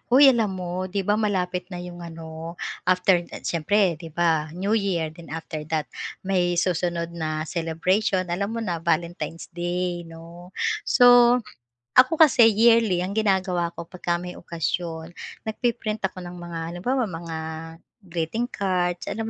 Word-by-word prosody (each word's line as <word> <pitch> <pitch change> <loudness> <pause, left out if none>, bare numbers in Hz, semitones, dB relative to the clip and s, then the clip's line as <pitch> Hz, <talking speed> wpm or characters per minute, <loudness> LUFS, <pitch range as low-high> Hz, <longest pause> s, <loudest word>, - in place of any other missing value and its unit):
Huy, 270 +2 +8
alam 225 -5 +1
mo? 180 +1 -3
'Di 200 +2 -1
ba 205 - +2
malapit 180 -4 -1
na 180 - -5
'yong 175 0 -8
ano, 165 0 -8 0.3
after, 185 0 +4
ah, - - -8
siyempre 180 +3 +2
'di 165 - -8
ba 160 -2 +1
New 195 +4 -1
Year 180 -6 0
then 165 +1 -13
after 160 -1 -5
that 155 -2 -1 0.4
may 180 -2 +1
susunod 170 -1 0
na 155 -2 -3
celebration 180 +4 0
alam 200 +4 -1
mo 230 - -2
na 175 -5 -2
Valentine's 170 -1 -2
Day 175 0 -2
'no. 170 +2 -12 0.4
So, 245 0 +7 0.5
ako 260 +6 +6
kasi 285 -8 +7
yearly 225 -4 +4
ang 190 - -3
ginagawa 190 -5 +1
ko 170 - -5
pagka 175 0 -2
may 180 +1 -6
okasyon, 165 0 -3 0.3
nagpi-print 220 -1 -2
ako 185 -1 -10
ng 175 0 -8
mga 170 -1 -6
halimbawa 250 +9 0
mga 165 -4 -5 0.6
greeting 180 +7 -2
cards 180 -3 -1
alam 210 +2 -3
180 Hz, 150 wpm, -24 LUFS, 170-200 Hz, 0.6 s, Huy